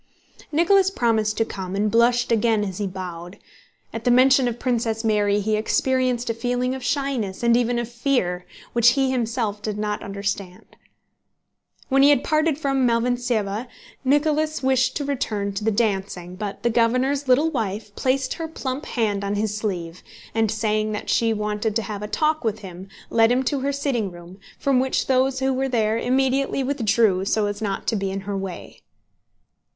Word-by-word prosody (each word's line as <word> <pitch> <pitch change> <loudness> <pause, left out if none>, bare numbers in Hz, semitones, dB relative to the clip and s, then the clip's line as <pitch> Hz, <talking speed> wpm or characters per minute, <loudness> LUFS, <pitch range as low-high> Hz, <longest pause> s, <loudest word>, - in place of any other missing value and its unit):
Nicholas 375 +5 +4
promised 220 - 0
to 225 - +2
come 190 -3 -6
and 210 +1 0
blushed 240 +1 +3
again 225 -1 +2
as 190 -2 -5
he 205 - -1
bowed. 180 -1 -7 0.6
At 225 - -5
the 245 - +2
mention 255 +1 +5
of 240 -1 -2
Princess 230 -3 -1
Mary 210 -2 +2
he 215 +1 0
experienced 250 +2 0
a - - -2
feeling 245 +2 -1
of 265 -1 -6
shyness 270 -9 -2
and 235 0 +4
even 245 0 +1
of 240 -1 -2
fear, 235 -8 -1 0.3
which 240 0 +5
he 270 -2 +1
himself 230 -4 -1
did 210 -1 -3
not 210 0 -2
understand. 200 -2 -5 1.1
When 270 0 +4
he 280 - +7
had 285 -3 +4
parted 310 -1 +1
from 275 -4 +1
Malvíntseva 235 -2 0 0.4
Nicholas 300 +1 +1
wished 260 -1 +2
to 290 - -2
return 210 -7 -2
to 200 +2 -4
the 220 - +2
dancing, 195 -5 -1
but 200 0 -6
the 235 - +2
governor's 255 +5 +1
little 290 +6 +4
wife 210 -5 -3
placed 260 0 0
her 325 - -5
plump 275 -3 -5
hand 210 -4 -1
on 200 +1 -1
his 210 0 -1
sleeve 185 -5 -4 0.3
and, 225 -1 +1
saying 215 0 0
that 210 - -3
she 230 -1 +2
wanted 210 0 -2
to 225 - +1
have 205 0 -5
a 210 - -4
talk 310 +6 0
with 220 -1 -2
him, 185 -1 -9 0.2
led 225 0 +4
him 255 +2 +2
to 280 +1 -1
her 275 +2 -1
sitting 270 -7 -1
room, 175 +2 -13 0.2
from 275 -2 +2
which 260 0 0
those 265 0 +1
who 265 0 +1
were 265 +1 -1
there 225 -2 +1
immediately 265 +2 +1
withdrew 225 -7 +2
so 210 +2 +1
as 205 +1 -4
not 200 -2 -3
to - - 0
be 195 -1 -1
in 195 +1 -4
her 200 +1 -4
way. 195 -2 -7
230 Hz, 180 wpm, -23 LUFS, 205-260 Hz, 1.1 s, he